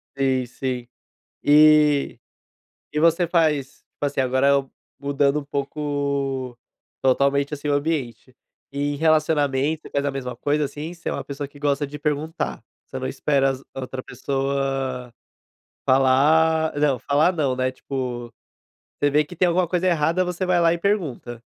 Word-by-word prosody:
Sim, 130 -2 +1
sim. 125 0 -4 0.6
E 150 -1 +5 0.7
e 150 - 0
você 170 +1 +4
faz 155 -5 0 0.2
faz, 145 -1 -1
assim, 135 - -1
agora 130 +2 +2
eu 140 -1 +2 0.3
mudando 140 +1 +1
um - - -11
pouco 140 -3 -2 0.4
totalmente, 140 +2 +2
assim, 145 +1 -6
o - - +2
ambiente. 140 -5 -3 0.4
E 145 +1 -2
em - - -5
relacionamento, 155 -1 +1
você - - -12
faz 140 0 -1
a 140 - +1
mesma 125 -3 -5
coisa, 145 +3 0
assim? 155 +5 -7
Você 165 - -7
é - - -1
uma - - -4
pessoa 140 0 -6
que 145 - -16
gosta 145 0 0
de 150 +1 -8
perguntar, 150 +3 -3 0.2
você - - -6
não - - -4
espera 135 - +1
as 130 0 -4
a 135 - -5
outra 130 0 -6
pessoa 135 -1 -2 0.7
falar 155 +5 +4
não, 145 -4 +2
falar 150 +8 +2
não, 140 -6 0
né, 130 0 0
tipo, 125 -3 -5 0.7
você 145 - +2
vê 150 +1 +4
que 175 - -11
tem 180 +2 +3
alguma 175 +1 +2
coisa 180 +2 -1
errada, 170 +2 +2
você 180 +1 -2
vai 180 -1 +2
lá 165 0 +4
e - - -2
pergunta. 155 - -2
140 Hz, 165 wpm, -23 LUFS, 135-155 Hz, 0.7 s, E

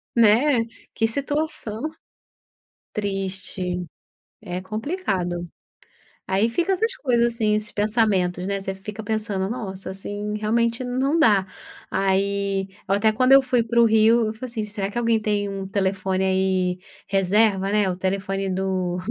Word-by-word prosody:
né, 235 +3 +5 0.3
que 225 - +2
situação. 280 -2 -2 1.1
Triste, 190 -3 -3 0.6
é 180 -3 -5
complicado. 190 - -2 0.8
Aí 195 +5 +2
fica 345 +10 0
essas 450 +5 0
coisas 240 -3 +1
assim, 215 -2 +1
esses 210 0 -3
pensamentos, 205 -4 +1
né, 200 0 -1
você 195 0 -3
fica 210 +2 -8
pensando: 210 -3 -2
“Nossa, 195 -5 -5
assim 205 +2 -4
realmente 230 +3 +1
não 260 +6 0
dá”, 205 -9 +5 0.4
aí 195 0 0 0.2
eu 195 - +3
até 220 +2 +3
quando 255 +4 +2
eu 275 - +9
fui 250 -3 +1
pro 235 +1 +3
Rio 225 +1 +4
eu 215 - -3
falei, 225 +4 -7
assim: 230 -2 -3
“Será 205 -2 -3
que 205 - -6
alguém 230 -1 +2
tem 205 -1 0
um 195 -1 -5
telefone 190 -1 0
aí 190 -1 +1 0.3
reserva, 195 0 +2
né?" 210 -2 +2
O 180 - -3
telefone 195 +1 -1
do 185 -1 -1
205 Hz, 140 wpm, -23 LUFS, 190-230 Hz, 1.1 s, eu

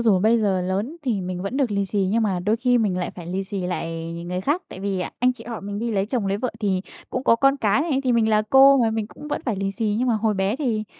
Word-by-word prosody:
dù 220 -5 +4
bây 220 +4 +3
giờ 195 -4 +1
lớn 200 - -2
thì 230 -7 0
mình 180 0 -4
vẫn 200 +7 -3
được 270 -5 +1
lì 200 -1 0
xì, 195 -1 0
nhưng 225 +1 +2
mà 190 -4 0
đôi 210 +5 +1
khi 245 0 +2
mình 200 -5 +1
lại 180 - -2
phải 175 -2 -10
lì 190 +3 -3
xì 195 0 -4
lại 165 -2 -4
ng 170 +1 -7
người 180 0 -2
khác. 300 - 0
Tại 185 - -9
vì 195 -2 -1 0.2
anh 250 +1 +3
chị 240 -2 -13
họ 230 -2 -6
mình 205 +1 -5
đi 235 +1 -2
lấy 200 -1 0
chồng, 235 -4 -1
lấy 195 +1 0
vợ 250 +3 -2
thì 190 -3 +1 0.3
cũng 255 - -3
có 230 - +5
con 275 +3 +3
cái 215 +1 +2
này, 295 -5 0
thì 250 - +2
mình 225 -2 +3
là 215 -1 +3
cô 270 +1 +8
mà, 230 -2 +3
mình 220 -1 -2
cũng 295 +6 -11
vẫn - - -3
phải 220 -5 0
lì 195 0 -1
xì. 210 0 -1
Nhưng 250 +1 +1
mà 230 - +3
hồi 215 -1 +1
bé 195 +5 0
thì, 230 -7 -1
215 Hz, 305 wpm, -23 LUFS, 195-240 Hz, 0.3 s, cô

